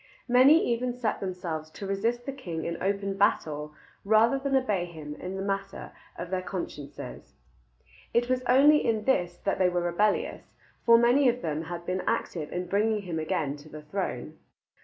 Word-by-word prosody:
Many 265 +6 +6
even 245 +1 -2
set 230 -4 -1
themselves 175 -5 -4
to 195 - -8
resist 225 +5 -1
the 275 - -3
king 175 -12 -5
in 170 0 -4
open 195 0 -1
battle 150 -7 0 0.3
rather 220 +6 +4
than 270 0 0
obey 210 -9 +1
him 155 -4 -8
in 180 +5 -6
the 195 - -3
matter 195 0 -4 0.3
of 180 - -6
their 185 -1 0
consciences. 150 - -7 0.8
It 240 +1 +2
was 255 0 +1
only 290 +4 +6
in 220 -2 0
this 175 -9 +1
that 195 - 0
they 185 -1 +4
were 175 0 0
rebellious, 190 +5 0 0.3
for 230 0 +9
many 245 +3 +5
of 245 +1 -2
them 155 0 -2
had 175 0 -6
been 185 +1 -1
active 155 -4 -2
in 180 +1 -3
bringing 210 +2 +1
him 170 -4 -3
again 155 -3 -1
to 145 +2 -14
the 155 0 -9
throne. 190 +6 -4
195 Hz, 180 wpm, -28 LUFS, 170-235 Hz, 0.8 s, for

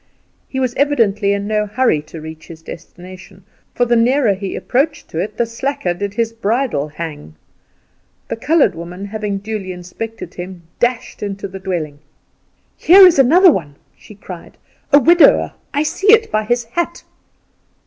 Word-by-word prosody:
He 265 - -4
was 255 -2 -1
evidently 225 -8 +2
in 200 0 -1
no 210 0 -1
hurry 210 -8 +1
to 165 - -9
reach 160 0 -10
his 160 -1 -12
destination, 185 +3 -12 0.3
for 245 - +2
the 240 0 +2
nearer 240 -1 +3
he 195 0 -5
approached 295 +4 -1
to 160 - -4
it 210 +4 -4
the 235 - +1
slacker 230 -5 -3
did 200 +3 -5
his 230 0 -1
bridle 225 - -1
hang. 150 - -8 0.9
The - - -3
coloured 290 - +2
woman 175 +4 -8
having 210 -1 -4
duly 200 -2 -5
inspected 180 +2 -8
him, 180 -1 -8 0.2
dashed 240 0 -1
into 200 -1 -4
the 190 0 -9
dwelling. 165 -6 -4 0.8
"Here 380 +3 +8
is 345 -6 +5
another 340 +8 +6
one!" 150 - -4 0.2
she 210 - -15
cried 180 -3 -11 0.3
"a 285 - +8
widower; 335 +5 +5 0.2
I 290 0 0
see 390 +6 +2
it 450 0 +4
by 215 0 0
his 240 +2 0
hat." 340 +9 -4
210 Hz, 160 wpm, -17 LUFS, 180-255 Hz, 0.9 s, Here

